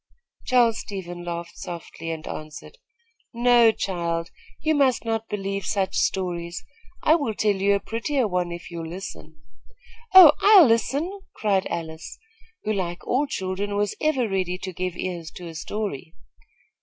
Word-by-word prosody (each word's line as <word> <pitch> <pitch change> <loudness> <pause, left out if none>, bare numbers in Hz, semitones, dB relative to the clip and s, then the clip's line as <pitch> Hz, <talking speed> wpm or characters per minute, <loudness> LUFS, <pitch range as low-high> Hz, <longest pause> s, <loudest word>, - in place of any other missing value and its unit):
Charles 240 -3 +3
Stevens 175 -3 -7
laughed 170 0 -5
softly 165 -1 -7
and 160 -1 -5
answered: 155 - -8 0.6
"No, 240 -1 +5
child. 170 -5 -3 0.3
You 315 +1 +1
must 270 -5 +2
not 225 0 -2
believe 195 -1 -3
such 195 -2 -1
stories. 175 -2 -1 0.4
I 310 - +5
will 280 -10 0
tell 210 -1 +2
you 200 +1 +2
a - - 0
prettier 230 +5 -1
one 180 -2 -1
if 170 +1 -8
you'll 165 -1 -5
listen." 170 -4 -9 0.7
"Oh, 360 -6 +12
I'll 405 -5 +8
listen!" 280 - 0 0.2
cried 195 -3 +1
Alice, 160 -1 -6 0.5
who, 215 - 0
like 175 -3 -3
all 280 +4 +1
children, 195 -1 -3
was 205 0 0
ever 275 -6 +1
ready 185 -2 -1
to 185 -1 -4
give 180 0 -4
ears 175 -3 -4
to 180 - -8
a 165 - -8
story. 160 -1 -5
195 Hz, 150 wpm, -24 LUFS, 170-230 Hz, 0.7 s, Oh